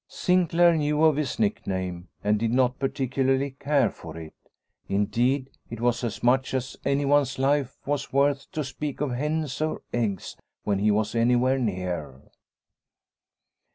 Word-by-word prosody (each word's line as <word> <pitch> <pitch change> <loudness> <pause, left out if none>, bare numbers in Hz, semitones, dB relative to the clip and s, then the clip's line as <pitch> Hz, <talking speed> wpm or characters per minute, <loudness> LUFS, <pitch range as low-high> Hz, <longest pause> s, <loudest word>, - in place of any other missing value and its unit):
Sinclaire 175 -1 +3
knew 150 0 +1
of 155 -2 +5
his 145 -3 -2
nickname, 95 - -2 0.2
and 105 0 +2
did 115 0 0
not 125 0 +2
particularly 135 0 0
care 140 -6 +2
for 80 -1 -10
it; 80 -1 -9 0.6
indeed, 120 +7 +1 0.2
it 115 - -7
was 120 +1 +1
as 110 -2 -4
much 130 +2 +2
as 130 0 -3
anyone's 140 -1 +2
life 135 0 +1
was 145 -1 -2
worth 140 0 +1
to 155 - -2
speak 145 +1 -5
of 145 -2 -1
hens 150 +2 -2
or 155 0 -2
eggs 105 -6 -2 0.3
when 100 -2 0
he 105 +2 +2
was 105 0 +1
anywhere 125 +3 +3
near. 90 - -4
130 Hz, 145 wpm, -26 LUFS, 110-145 Hz, 0.6 s, of